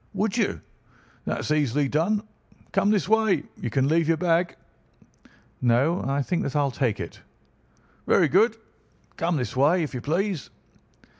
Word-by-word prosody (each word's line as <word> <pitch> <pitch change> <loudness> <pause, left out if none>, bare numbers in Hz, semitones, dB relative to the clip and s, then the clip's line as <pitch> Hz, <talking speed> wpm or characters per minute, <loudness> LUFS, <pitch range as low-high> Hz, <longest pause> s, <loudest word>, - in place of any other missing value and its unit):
"Would 205 +2 0
you? 225 -4 0 0.6
That - - -2
is - - -4
easily 145 -2 +1
done. 175 +9 0 0.5
Come 200 0 +2
this 210 -3 +1
way. 215 -7 +2
You - - -5
can 135 +4 +1
leave 160 +1 +2
your 165 0 +2
bag." 175 +1 +1 1.1
"No, 130 +8 +2
I 140 +1 -1
think 175 +5 -1
that 140 - -3
I'll 145 -2 +2
take 125 -5 -1
it." - - -7 0.9
"Very - - +4
good. - - +3 0.6
Come 170 -1 0
this 125 -2 -3
way, 155 +7 +3
if 150 - -5
you 125 - -4
please." 175 - -1
160 Hz, 155 wpm, -25 LUFS, 140-185 Hz, 1.1 s, Very